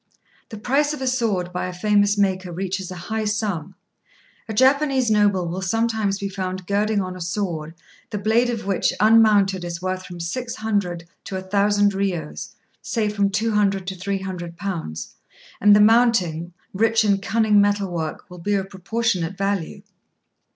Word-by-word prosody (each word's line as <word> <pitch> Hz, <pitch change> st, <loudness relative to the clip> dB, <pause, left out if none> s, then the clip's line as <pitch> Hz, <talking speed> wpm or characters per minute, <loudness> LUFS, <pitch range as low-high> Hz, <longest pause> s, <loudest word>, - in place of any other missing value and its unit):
The 220 Hz, -, -8 dB
price 280 Hz, +7 st, +1 dB
of 300 Hz, -, -7 dB
a -, -, -1 dB
sword 215 Hz, -9 st, 0 dB
by 180 Hz, -, -2 dB
a -, -, -4 dB
famous 205 Hz, +2 st, +2 dB
maker 190 Hz, -2 st, 0 dB
reaches 190 Hz, +1 st, -3 dB
a 185 Hz, -, -6 dB
high 220 Hz, +5 st, -3 dB
sum: 205 Hz, -7 st, -2 dB, 0.7 s
a -, -, -2 dB
Japanese 265 Hz, -1 st, +3 dB
noble 205 Hz, -4 st, +3 dB
will 180 Hz, +3 st, -4 dB
sometimes 220 Hz, 0 st, 0 dB
be 200 Hz, -, -3 dB
found 185 Hz, -1 st, -4 dB
girding 205 Hz, +2 st, +1 dB
on 185 Hz, -1 st, -5 dB
a 180 Hz, -, -9 dB
sword, 170 Hz, -3 st, -3 dB, 0.3 s
the 210 Hz, -, -3 dB
blade 220 Hz, +4 st, +2 dB
of 230 Hz, -4 st, -3 dB
which 195 Hz, -2 st, +1 dB
unmounted 210 Hz, -4 st, +4 dB
is 170 Hz, -1 st, -5 dB
worth 185 Hz, +1 st, -3 dB
from 175 Hz, -2 st, -9 dB
six 235 Hz, +8 st, -4 dB
hundred 200 Hz, -6 st, -2 dB, 0.2 s
to 190 Hz, -, -4 dB
a -, -, -4 dB
thousand 205 Hz, +1 st, +2 dB
riyos, 185 Hz, -6 st, -3 dB, 0.3 s
say 220 Hz, -4 st, -1 dB
from 200 Hz, -1 st, +1 dB
£200 205 Hz, -2 st, +1 dB
to 190 Hz, +1 st, -4 dB
£300, 180 Hz, -, -5 dB, 0.5 s
and 205 Hz, +1 st, +7 dB
the -, -, +5 dB
mounting, 210 Hz, -7 st, +3 dB, 0.2 s
rich 225 Hz, +2 st, +2 dB
in 200 Hz, -1 st, +3 dB
cunning 215 Hz, 0 st, +3 dB
metal 205 Hz, -2 st, +1 dB
work, 160 Hz, 0 st, -4 dB
will 180 Hz, -2 st, -11 dB
be 205 Hz, +4 st, 0 dB
of 195 Hz, 0 st, -3 dB
proportionate 190 Hz, -2 st, -1 dB
value. 195 Hz, -4 st, -2 dB
200 Hz, 165 wpm, -22 LUFS, 185-215 Hz, 0.7 s, and